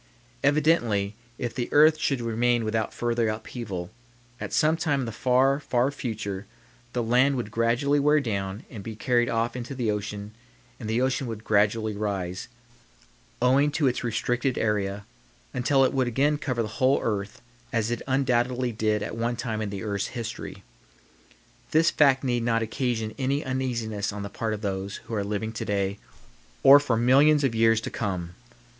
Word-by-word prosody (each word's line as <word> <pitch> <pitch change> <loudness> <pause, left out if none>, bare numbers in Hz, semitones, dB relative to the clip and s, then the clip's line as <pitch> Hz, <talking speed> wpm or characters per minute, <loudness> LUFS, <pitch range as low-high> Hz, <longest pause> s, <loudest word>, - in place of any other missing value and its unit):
Evidently 140 -9 +2 0.2
if 120 -2 -3
the 120 -1 -3
earth 155 +1 +6
should 135 -5 0
remain 115 0 +1
without 110 0 -1
further 120 -1 0
upheaval, 110 -4 -5 0.5
at - - -5
some 155 +1 +3
time 150 -4 0
in - - -2
the 115 - -4
far, 130 +4 +2
far 130 -1 +1
future 105 -7 -5 0.5
the 120 - 0
land 125 +4 +3
would 120 -4 -4
gradually 120 +6 +2
wear 150 +2 +4
down 100 -4 -3
and 105 -6 -8
be 110 +1 -6
carried 120 +1 +1
off 115 +1 0
into 125 +2 -5
the 120 -4 0
ocean 105 0 -5 0.5
and 110 - -5
the 115 +2 +1
ocean 130 0 0
would 110 -2 -6
gradually 105 +1 +1
rise, 95 -3 -3 1.0
owing 135 +4 +4
to 145 0 0
its 125 -1 +1
restricted 120 +2 -1
area, 100 -2 -1 0.5
until 135 +2 +3
it - - 0
would 130 -2 +1
again 140 +5 +2
cover 130 -7 -1
the - - -3
whole 130 +1 +4
earth 105 -1 -2 0.3
as 115 -1 0
it 120 - -2
undoubtedly 125 -2 +1
did 110 -1 0
at - - -5
one 115 +1 -1
time 115 -2 -3
in 105 - -2
the 100 0 -5
earth's 100 -2 -2
history. 115 0 -6 1.1
This 160 +2 +4
fact 135 -3 +4
need 120 -2 0
not 115 -1 +1
occasion 115 -2 -2
any 140 +2 0
uneasiness 120 -6 -2
on 105 0 -6
the 100 - -5
part 110 0 -2
of 105 - -9
those 100 -1 -3
who - - -8
are 105 -2 0
living 105 +2 -3
to 115 - -4
day 100 0 -1 0.6
or 140 +1 +10
for 130 -6 0
millions 140 +5 +5
of 135 -4 +1
years 115 0 +4
to - - -5
come. 90 -5 -3
115 Hz, 175 wpm, -26 LUFS, 105-130 Hz, 1.1 s, or